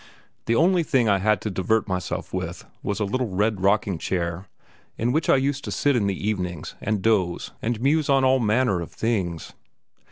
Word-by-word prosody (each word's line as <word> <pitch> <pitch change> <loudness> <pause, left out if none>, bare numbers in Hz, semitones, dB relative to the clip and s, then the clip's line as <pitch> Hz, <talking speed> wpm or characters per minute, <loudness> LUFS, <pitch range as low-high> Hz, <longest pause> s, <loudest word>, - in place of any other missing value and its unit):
The 115 - +2
only 175 +5 +4
thing 130 -7 +2
I 100 -2 +3
had 105 0 +2
to 110 - -3
divert 105 +5 0
myself 90 -3 -3
with - - -4 0.2
was 100 +1 -2
a 105 - +1
little 125 +5 -1
red 100 +1 0
rocking 100 -2 +2
chair, 85 0 -3 0.5
in 120 +2 0
which 155 +4 0
I - - +7
used 135 +1 0
to - - -4
sit 145 -2 +1
in 105 -5 +1
the 100 +1 -2
evenings 90 -6 -3
and 105 -2 -1
doze 95 -6 +1
and 115 -1 -1
muse 145 +4 +2
on 135 -1 +4
all 130 0 +4
manner 110 -4 +2
of 85 - -7
things. 95 -8 -2
105 Hz, 195 wpm, -24 LUFS, 95-130 Hz, 0.5 s, I